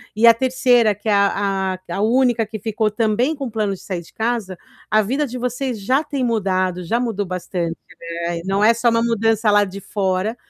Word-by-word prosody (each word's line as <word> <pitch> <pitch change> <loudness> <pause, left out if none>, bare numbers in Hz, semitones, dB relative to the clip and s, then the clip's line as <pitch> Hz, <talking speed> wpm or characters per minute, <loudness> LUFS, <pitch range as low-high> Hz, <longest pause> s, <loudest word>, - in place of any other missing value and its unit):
e 220 +2 +3
a 230 - +9
terceira 245 -3 +2
que 210 +3 -10
é - - +4
a 195 -1 +1 0.2
a - - -3
a - - -1
única 240 +1 +2
que 215 +1 -7
ficou 215 +1 -1
também 230 +7 +1
com 275 -3 -5
plano 215 -3 -1
de 190 - -9
sair 185 -3 -4
de 165 - -18
casa, 220 -5 -2 0.3
a 215 - +4
vida 265 +8 -1
de 250 0 -6
vocês 250 -1 -3
já 260 +9 +1
tem 285 -3 -3
mudado, 185 -5 0
já 225 +8 0
mudou 225 -5 -2
bastante, 180 -2 -4 0.5
né, 170 0 -2
e - - -9
não 195 +2 +1
é 225 +2 +6
só 235 +1 +2
uma 230 0 +2
mudança 225 -1 +1
lá 205 0 +5
de 200 0 -6
fora, 195 +2 -1
215 Hz, 215 wpm, -20 LUFS, 195-235 Hz, 0.5 s, a